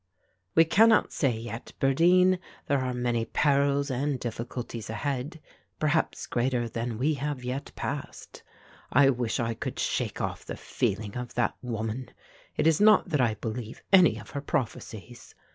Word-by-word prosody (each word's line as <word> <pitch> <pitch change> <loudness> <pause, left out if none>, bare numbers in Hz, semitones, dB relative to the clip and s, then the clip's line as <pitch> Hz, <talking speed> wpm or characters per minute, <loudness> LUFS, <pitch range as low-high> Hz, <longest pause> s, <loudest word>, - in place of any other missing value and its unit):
"We 165 - +7
cannot 220 +6 +4
say 130 -6 +1
yet, 115 0 -7
birdeen, 180 +7 +4 0.3
there 140 -1 +1
are 130 -1 -1
many 120 -2 0
perils 140 +1 +2
and 135 +1 -1
difficulties 120 -1 -5
ahead, 140 +6 -3 0.4
perhaps 155 +1 0
greater 120 -1 0
than 115 0 -4
we 145 +6 +1
have 145 -2 -3
yet 125 +3 -4
passed. - - -6 0.5
I 135 -1 +6
wish 120 -3 -2
I 115 -1 0
could - - -5
shake - - -1
off - - -3
the - - -7
feeling 100 +1 -2
of 125 -1 -6
that 120 - +1
woman. 115 +1 -4 0.5
It - - +1
is 160 +3 +4
not 215 -3 +6
that 150 -5 +2
I 115 -3 +2
believe 110 +2 -6
any 185 -3 +7
of - - -11
her 140 - -4
prophecies. 120 - -5
130 Hz, 155 wpm, -28 LUFS, 115-145 Hz, 0.5 s, We